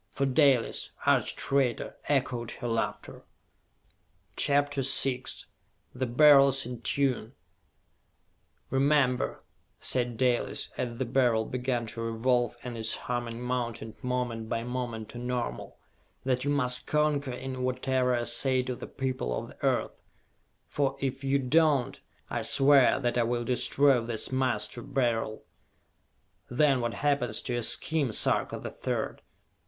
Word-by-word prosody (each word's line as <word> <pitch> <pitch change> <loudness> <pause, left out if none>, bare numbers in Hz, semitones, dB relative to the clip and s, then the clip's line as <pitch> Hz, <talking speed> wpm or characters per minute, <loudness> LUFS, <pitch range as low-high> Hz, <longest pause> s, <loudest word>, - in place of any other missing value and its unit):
For 140 - -1
Dalis, 135 -2 +2 0.2
arch - - +2
traitor, 135 -4 0
echoed 125 -4 0
her 120 - -6
laughter! 115 -1 -3 1.1
CHAPTER 145 0 +2
VI 135 -1 +2 0.7
The 130 +1 -2
Beryls 135 0 +6
in 125 -1 -7
Tune 130 -4 -1 1.4
"Remember," 135 -1 +1 0.4
said 120 -2 +1
Dalis, 125 -1 0
as 120 -2 -4
the 130 - -1
Beryl 120 -3 +2
began 125 -1 -2
to 115 +1 -6
revolve 120 +1 0
and 125 -1 -6
its 110 0 0
humming 120 -1 -4
mounted 120 -3 -4
moment 125 -3 -2
by 115 - -2
moment 120 -3 -4
to 120 - -8
normal, 120 - -4 0.5
"that 130 -1 0
you 145 - -1
must 125 -3 +3
concur 150 -3 +1
in 130 +1 -5
whatever 130 0 0
I 120 - -1
say 130 +2 +1
to 125 0 -4
the - - -8
people 130 - -3
of - - -6
the - - -17
Earth - - 0 0.7
for 135 -1 -1
if 135 0 -3
you 135 0 +2
do 140 +4 +3
not, 150 -6 +1 0.3
I - - -3
swear 135 -2 +5
that 120 -2 0
I - - +3
will 120 +1 -1
destroy 130 +2 +2
this 115 +1 -3
Master 130 -2 0
Beryl! 115 -4 -1 1.1
Then 135 0 +2
what 120 -1 -2
happens 140 -6 0
to 125 - -2
your 120 - -1
scheme, 145 +2 +1
Sarka - - 0
the - - -7
Third? - - -3
125 Hz, 135 wpm, -28 LUFS, 120-135 Hz, 1.4 s, Beryls